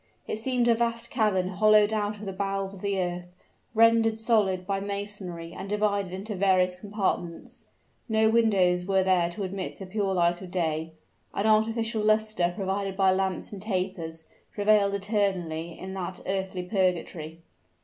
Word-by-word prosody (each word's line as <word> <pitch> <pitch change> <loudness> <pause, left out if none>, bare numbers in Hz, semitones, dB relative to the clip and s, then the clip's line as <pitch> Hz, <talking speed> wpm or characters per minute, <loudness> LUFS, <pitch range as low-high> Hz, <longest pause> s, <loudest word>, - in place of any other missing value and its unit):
It 215 - -3
seemed 245 0 +1
a 235 - +6
vast 230 0 -1
cavern 205 -6 +1
hollowed 215 +2 +4
out 210 -1 -1
of 210 - -9
the 195 - -4
bowels 195 0 -2
of 190 - -11
the 200 -1 -1
earth, 175 -1 -3 0.5
rendered 225 0 +5
solid 210 -5 +2
by 195 0 -1
masonry 200 -4 -5
and 195 - -7
divided 205 -2 0
into 195 +4 -5
various 185 -2 +2
compartments. 190 -4 -3 0.4
No 220 0 +3
windows 195 -6 +3
were 190 -1 +3
there 180 -2 +3
to 200 +4 -5
admit 190 0 -4
the 195 - -7
pure 195 0 -1
light 175 0 +2
of 185 - -8
day; 160 -2 -2 0.4
an 200 - 0
artificial 220 +1 +2
luster, 215 -4 +2
provided 195 -1 -2
by 190 -1 +4
lamps 190 +1 -1
and 195 - -7
tapers, 180 -5 -3 0.3
prevailed 205 -1 +3
eternally 190 -5 -1
in 190 0 -7
that 185 -1 -5
earthly 190 -1 -2
purgatory. 180 -4 -1
195 Hz, 160 wpm, -27 LUFS, 180-215 Hz, 0.5 s, a